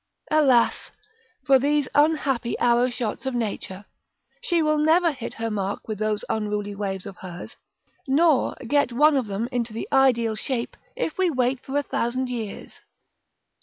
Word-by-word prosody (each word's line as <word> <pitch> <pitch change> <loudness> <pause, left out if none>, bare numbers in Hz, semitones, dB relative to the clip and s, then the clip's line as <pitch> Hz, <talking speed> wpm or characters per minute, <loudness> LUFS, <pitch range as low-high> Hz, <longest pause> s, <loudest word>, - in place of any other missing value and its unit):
Alas, 270 -6 +3 0.6
for 270 -2 +5
these 290 +1 +1
unhappy 290 -5 +1
arrow 245 +1 +3
shots 245 0 -4
of 265 - -2
Nature; 205 -4 -4 0.6
she 340 -2 +1
will 305 0 +2
never 330 +3 +4
hit 255 -5 -7
her 225 0 -3
mark 200 -1 -3
with 215 -2 -4
those 215 -1 -1
unruly 210 -1 -2
waves 195 -2 -4
of 195 -2 -9
hers, 180 -1 -9 0.5
nor 295 0 +3
get 285 0 +2
one 295 +5 +4
of 260 -5 0
them, 205 +4 -2
into 240 -3 -2
the 225 - -5
ideal 245 -4 +3
shape, 235 +2 -3 0.2
if 380 -9 -3
we 370 -2 +3
wait 255 -2 0
for 270 +2 -3
a 290 - +1
thousand 255 0 -2
years. 225 -4 -6
245 Hz, 160 wpm, -24 LUFS, 215-285 Hz, 0.6 s, for